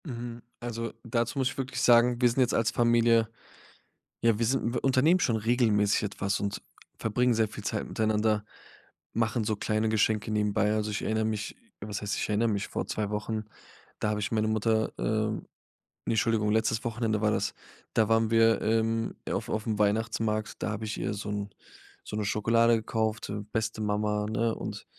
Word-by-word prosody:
Mhm, 120 Hz, -3 st, -6 dB, 0.2 s
also, 115 Hz, -1 st, -4 dB
dazu 120 Hz, +2 st, -1 dB
muss 130 Hz, -1 st, +2 dB
ich 130 Hz, -, -9 dB
wirklich 130 Hz, -1 st, -3 dB
sagen, 120 Hz, 0 st, +5 dB
wir 125 Hz, -, +6 dB
sind 120 Hz, -, -2 dB
jetzt 125 Hz, -, +2 dB
als 115 Hz, -1 st, +2 dB
Familie 115 Hz, -1 st, +3 dB, 0.9 s
ja, 115 Hz, -2 st, +3 dB
wir 115 Hz, -, +1 dB
sind 125 Hz, -1 st, 0 dB
wir -, -, -2 dB
unternehmen 135 Hz, +7 st, +4 dB
schon 115 Hz, -8 st, +2 dB
regelmäßig 110 Hz, -3 st, +2 dB
etwas 100 Hz, -1 st, -2 dB
und 100 Hz, 0 st, -2 dB, 0.4 s
verbringen 125 Hz, +3 st, +1 dB
sehr 110 Hz, -1 st, +2 dB
viel 105 Hz, 0 st, -9 dB
Zeit 105 Hz, 0 st, -2 dB
miteinander, 110 Hz, -1 st, +1 dB, 0.7 s
machen 115 Hz, 0 st, 0 dB
so 110 Hz, 0 st, 0 dB
kleine 110 Hz, +2 st, 0 dB
Geschenke 110 Hz, 0 st, +1 dB
nebenbei. 105 Hz, 0 st, +1 dB
Also, 105 Hz, 0 st, -1 dB
ich 100 Hz, -, -3 dB
erinnere 110 Hz, 0 st, 0 dB
mich 110 Hz, -1 st, -3 dB, 0.3 s
was 105 Hz, -1 st, -4 dB
heißt, 105 Hz, 0 st, -2 dB
ich -, -, -2 dB
erinnere 110 Hz, +2 st, +2 dB
mich, 100 Hz, -2 st, -1 dB
vor -, -, -3 dB
2 105 Hz, -2 st, -2 dB
Wochen, 105 Hz, +1 st, -3 dB, 0.6 s
da 105 Hz, -, +1 dB
habe 105 Hz, 0 st, -1 dB
ich 100 Hz, -, -2 dB
meine 110 Hz, -1 st, +1 dB
Mutter, 110 Hz, 0 st, +1 dB
ähm 110 Hz, 0 st, -1 dB, 0.6 s
ne, -, -, 0 dB
Entschuldigung, 110 Hz, -2 st, +2 dB
letztes 110 Hz, +1 st, +1 dB
Wochenende 110 Hz, -2 st, -1 dB
war 105 Hz, -1 st, +3 dB
das, 105 Hz, -1 st, -1 dB, 0.4 s
da 110 Hz, -2 st, +3 dB
waren 115 Hz, 0 st, +3 dB
wir 115 Hz, 0 st, +4 dB
im 115 Hz, +1 st, 0 dB, 0.2 s
auf -, -, -2 dB
aufm 110 Hz, -1 st, -2 dB
Weihnachtsmarkt, 110 Hz, +1 st, 0 dB
da -, -, -1 dB
hab 105 Hz, +1 st, -4 dB
ich 110 Hz, 0 st, -4 dB
ihr 105 Hz, -, -1 dB
so 105 Hz, 0 st, -5 dB
'n 100 Hz, 0 st, -3 dB, 0.6 s
so -, -, -6 dB
'ne 105 Hz, -, -1 dB
Schokolade 115 Hz, +3 st, +3 dB
gekauft, 110 Hz, 0 st, -2 dB
ähm, 105 Hz, 0 st, -5 dB
beste 110 Hz, 0 st, -2 dB
Mama, 105 Hz, 0 st, 0 dB
ne? 115 Hz, +1 st, 0 dB
Und -, -, -6 dB
110 Hz, 185 wpm, -28 LUFS, 105-115 Hz, 0.9 s, wir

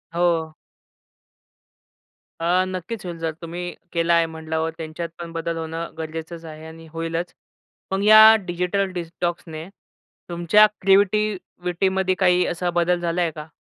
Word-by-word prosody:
हो. 170 Hz, -2 st, +1 dB, 1.9 s
अ, 175 Hz, +2 st, +2 dB
नक्कीच 185 Hz, +3 st, -5 dB
होईल. 175 Hz, -1 st, -5 dB
जर 165 Hz, -1 st, -1 dB
तुम्ही 175 Hz, +1 st, -5 dB, 0.2 s
केला 170 Hz, 0 st, +2 dB
आहे 170 Hz, 0 st, +4 dB
म्हणल्यावर 160 Hz, 0 st, -3 dB
त्यांच्यात 165 Hz, +1 st, -5 dB
पण 170 Hz, -1 st, -7 dB
बदल 165 Hz, 0 st, -3 dB
होणं 165 Hz, +1 st, -5 dB
गरजेचंच 160 Hz, +1 st, -6 dB
आहे 155 Hz, 0 st, -9 dB
आणि 160 Hz, 0 st, -12 dB
होईलच. 165 Hz, +1 st, -3 dB, 0.6 s
मग 195 Hz, +1 st, 0 dB
या 215 Hz, +1 st, +9 dB
डिजिटल 180 Hz, +2 st, -1 dB
डिटॉक्सने 170 Hz, -2 st, -4 dB, 0.6 s
तुमच्या 175 Hz, +5 st, +5 dB, 0.2 s
क्रिएटिविटीमध्ये 190 Hz, -2 st, +1 dB
काही 180 Hz, 0 st, +3 dB
असा 175 Hz, +1 st, -2 dB
बदल 175 Hz, 0 st, +1 dB
झाला 170 Hz, +1 st, -1 dB
आहे 170 Hz, -2 st, +1 dB
का? 150 Hz, 0 st, -8 dB
170 Hz, 130 wpm, -23 LUFS, 165-180 Hz, 1.9 s, या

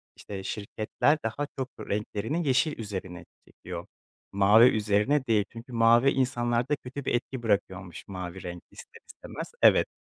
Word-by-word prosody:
işte, 95 Hz, -2 st, -8 dB
şirketler 105 Hz, +9 st, 0 dB
daha 115 Hz, +6 st, -2 dB
çok 130 Hz, -1 st, -3 dB
renklerini 110 Hz, +10 st, -2 dB
yeşil 140 Hz, +4 st, +2 dB
üzerine 95 Hz, -4 st, -6 dB, 0.2 s
çekiyor. -, -, -8 dB, 0.4 s
Mavi 100 Hz, +4 st, +6 dB
üzerine 110 Hz, +6 st, +1 dB
değil 110 Hz, -4 st, +2 dB
çünkü 120 Hz, +2 st, -11 dB
mavi 115 Hz, +3 st, +5 dB
insanlarda 125 Hz, 0 st, 0 dB
kötü 135 Hz, 0 st, -8 dB
bir -, -, 0 dB
etki 120 Hz, +1 st, -4 dB
bırakıyormuş 95 Hz, -4 st, -2 dB
mavi 90 Hz, -1 st, -7 dB
renk, 90 Hz, 0 st, -7 dB
ister -, -, -13 dB
istemez. -, -, -8 dB
Evet, -, -, +6 dB
115 Hz, 140 wpm, -28 LUFS, 100-130 Hz, 0.4 s, Mavi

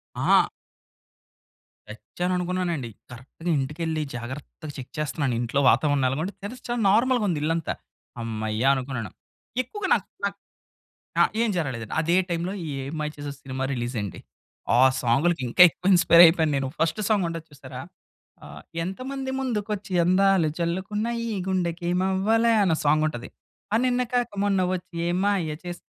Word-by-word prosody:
ఆ! -, -, +4 dB, 1.4 s
చచ్చాననుకున్నానండి. 175 Hz, -, -2 dB, 0.2 s
కరెక్ట్‌గా 130 Hz, +8 st, -7 dB
ఇంటికెళ్ళి 155 Hz, +3 st, -2 dB
జాగ్రత్తగా 130 Hz, +5 st, -8 dB
చెక్ 130 Hz, -, -9 dB
చేస్తున్నాను. 145 Hz, -4 st, -1 dB
ఇంట్లో 120 Hz, +4 st, 0 dB
వాతావరణం 140 Hz, +2 st, +2 dB
ఎలాగుంది, 160 Hz, +9 st, -2 dB
తెరిస్తే 235 Hz, +5 st, -8 dB
చాలా 240 Hz, -1 st, -1 dB
నార్మల్‌గా 240 Hz, +1 st, +3 dB
ఉంది 155 Hz, -4 st, -1 dB
ఇల్లంతా. 165 Hz, +1 st, 0 dB, 0.5 s
హమ్మయ్య! 110 Hz, -1 st, -3 dB
అనుకున్నాను. 130 Hz, -4 st, -4 dB, 0.5 s
ఎక్కువగా 390 Hz, -, -5 dB
నాక్ 195 Hz, -, -3 dB, 0.2 s
నాక్ 200 Hz, 0 st, -2 dB, 0.8 s
ఆ! -, -, +9 dB, 0.2 s
ఏం 235 Hz, -, +2 dB
జరగలేదండి. 125 Hz, -9 st, -3 dB
అదే 170 Hz, +2 st, +2 dB
టైంలో 175 Hz, +2 st, -2 dB
ఈ -, -, -4 dB
'ఏం 135 Hz, +2 st, -6 dB
మాయ 150 Hz, 0 st, -2 dB
చేసావె' 145 Hz, -1 st, -6 dB
సినిమా 130 Hz, 0 st, -4 dB
రిలీజ్ 120 Hz, -1 st, -3 dB
అయింది. 100 Hz, -4 st, -6 dB, 0.5 s
ఆ -, -, +5 dB, 0.3 s
సాంగులకి 140 Hz, +6 st, +2 dB
ఇంకా 150 Hz, +9 st, +6 dB
ఎక్కువ 180 Hz, +4 st, -1 dB
ఇన్స్పైర్ 170 Hz, -1 st, +7 dB
అయిపోయాను 160 Hz, -2 st, +3 dB
నేను. 135 Hz, -1 st, -1 dB
ఫస్ట్ 165 Hz, +4 st, 0 dB
సాంగ్ 205 Hz, -4 st, +2 dB
ఉంటది 165 Hz, -1 st, -5 dB
చూసారా? 130 Hz, -3 st, -10 dB, 0.7 s
ఆహ్, 75 Hz, 0 st, -11 dB, 0.2 s
ఎంతమంది 265 Hz, +7 st, -4 dB
ముందుకు 220 Hz, -5 st, -2 dB
వచ్చి 200 Hz, -1 st, -8 dB
అందాలు 185 Hz, -1 st, +4 dB
చల్లుకున్నా 190 Hz, +6 st, -2 dB, 0.2 s
ఈ -, -, -3 dB, 0.2 s
గుండెకేమవ్వాలా 190 Hz, +5 st, +1 dB
అనొ 170 Hz, -5 st, +2 dB
సాంగ్ 155 Hz, +1 st, +3 dB
ఉంటది. 120 Hz, -5 st, -7 dB, 0.5 s
అ! -, -, +5 dB
నిన్నగాక 245 Hz, -1 st, 0 dB
మొన్న 200 Hz, -2 st, +2 dB
వచ్చి 180 Hz, -1 st, -7 dB
ఏం 175 Hz, +1 st, 0 dB
మాయ 175 Hz, -7 st, 0 dB
చేసావే 175 Hz, -1 st, -7 dB
170 Hz, 140 wpm, -25 LUFS, 135-195 Hz, 1.4 s, ఆ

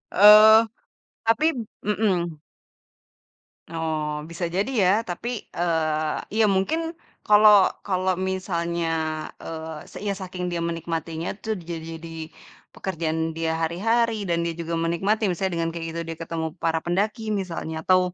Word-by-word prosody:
Eee, 215 Hz, +2 st, +9 dB, 0.7 s
tapi 230 Hz, +7 st, +3 dB, 0.4 s
p -, -, -10 dB
mhm. 175 Hz, -7 st, 0 dB, 1.3 s
Oh, 155 Hz, -2 st, -2 dB
bisa 175 Hz, +2 st, -4 dB
jadi 195 Hz, +9 st, -1 dB
ya. 180 Hz, -, +5 dB, 0.2 s
Tapi, 230 Hz, +6 st, -4 dB
eee, 155 Hz, -2 st, 0 dB, 0.2 s
ya -, -, +6 dB
mungkin 195 Hz, +12 st, +1 dB, 0.5 s
kalau 210 Hz, -2 st, +7 dB, 0.2 s
kalau 185 Hz, -2 st, 0 dB
misalnya, 170 Hz, -3 st, -2 dB, 0.6 s
eee, 160 Hz, -1 st, -6 dB
se -, -, -15 dB
iya 205 Hz, -1 st, -1 dB
saking 180 Hz, -2 st, -5 dB
dia 170 Hz, -1 st, -2 dB
menikmatinya 165 Hz, 0 st, -3 dB
tuh 220 Hz, -, -2 dB, 0.2 s
ja 170 Hz, -, -3 dB
jadi 165 Hz, 0 st, -7 dB
di 165 Hz, -1 st, -8 dB, 0.4 s
pekerjaan 165 Hz, -4 st, -3 dB, 0.2 s
dia 165 Hz, 0 st, 0 dB
hari-hari, 220 Hz, +6 st, +1 dB
dan 170 Hz, -1 st, +1 dB
dia 170 Hz, -1 st, -2 dB
juga 170 Hz, 0 st, -5 dB
menikmati, 170 Hz, +7 st, 0 dB
misalnya 185 Hz, +1 st, -1 dB
dengan 165 Hz, 0 st, 0 dB
kayak 165 Hz, 0 st, -5 dB
gitu 170 Hz, -, -4 dB
dia 165 Hz, -, -4 dB
ketemu 165 Hz, -1 st, -3 dB
para 165 Hz, -1 st, +1 dB
pendaki 210 Hz, +6 st, -1 dB
misalnya, 160 Hz, -3 st, -5 dB
atau, 185 Hz, 0 st, +5 dB
170 Hz, 140 wpm, -24 LUFS, 165-195 Hz, 1.3 s, Eee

